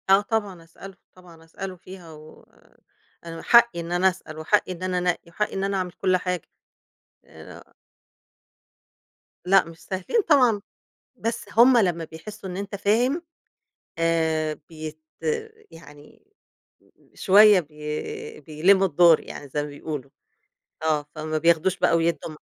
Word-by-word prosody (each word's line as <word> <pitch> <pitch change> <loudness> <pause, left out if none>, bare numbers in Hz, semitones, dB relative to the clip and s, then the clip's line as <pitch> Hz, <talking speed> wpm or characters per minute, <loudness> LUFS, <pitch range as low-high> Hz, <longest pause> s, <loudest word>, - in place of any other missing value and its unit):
آه، 195 +1 +6
طبعًا 205 -6 -3
أسأله، 185 +4 -13 0.2
طبعًا 175 -3 -17
أسأله 185 +3 -8
فيها، 180 -2 -12
و 155 0 -15 0.8
أنا 165 -1 -7
حقي 235 -6 +5
إن 170 0 -6
أنا 180 +2 +3
أسأل، 180 -4 -10
وحقي 185 +5 +1
إن 180 0 -7
أنا 185 -1 -1
أنقِّي، 175 -1 -2
وحقي 210 +5 -3
إن 195 - -2
أنا 195 0 -1
أعمل 180 -1 -3
كل 185 +1 +1
حاجة، 180 -2 -4 0.8
أ - - -13 1.8
لأ، 195 +1 +5
مش 165 0 -13
سهلين 190 - -1
طبعًا، 250 -8 +4 0.5
بس 230 +1 -4
هُم 245 +3 +6
لمّا 175 -6 +1
بيحسوا 190 +5 -10
إن 180 - -6
أنت 200 +1 -5
فاهم 240 - +1 0.8
آآ، 160 -2 0
بيت 155 -1 -8 0.7
يعني 150 - -16 0.9
شوية 205 0 +6
بي 155 - -7
بيلِّموا 185 +5 +3
الدور 170 -1 +5
يعني 145 - -10
زي 145 +2 -2
ما 150 - -6
بيقولوا، 145 -2 -7 0.7
آه 155 -2 0
فما 155 0 -3
بياخدوش 170 +3 +2
بقى، 165 - +3
ويدّوا 165 0 -1
م - - -12
180 Hz, 135 wpm, -24 LUFS, 160-195 Hz, 1.8 s, آه